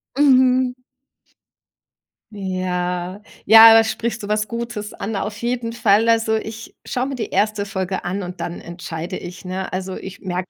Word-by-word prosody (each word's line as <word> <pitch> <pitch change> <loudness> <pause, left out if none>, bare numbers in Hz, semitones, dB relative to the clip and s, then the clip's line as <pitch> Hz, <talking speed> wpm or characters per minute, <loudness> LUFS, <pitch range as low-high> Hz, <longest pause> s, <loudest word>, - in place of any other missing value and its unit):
Mhm. 260 -2 +4 1.6
Ja. 185 -1 -3 0.2
Ja, 225 +2 +10
da 225 0 +7
sprichst 230 +1 -3
du 205 - -6
was 210 0 -1
Gutes 230 -3 -5
an, 205 +1 -5
auf 210 +2 -3
jeden 235 -1 -2
Fall. 225 -1 +3
Also, 225 -1 +3
ich 220 +1 -6
schaue 250 0 -2
mir 275 - -4
die 225 -4 -4
erste 215 -1 0
Folge 190 -1 -3
an 190 +3 -3
und 180 0 -7
dann 170 - -5
entscheide 170 -1 -6
ich, 180 +1 -9
ne? 185 +1 -4
Also, 185 0 -4
ich 190 +1 -9
merke 180 -1 -4
210 Hz, 160 wpm, -20 LUFS, 185-230 Hz, 1.6 s, Ja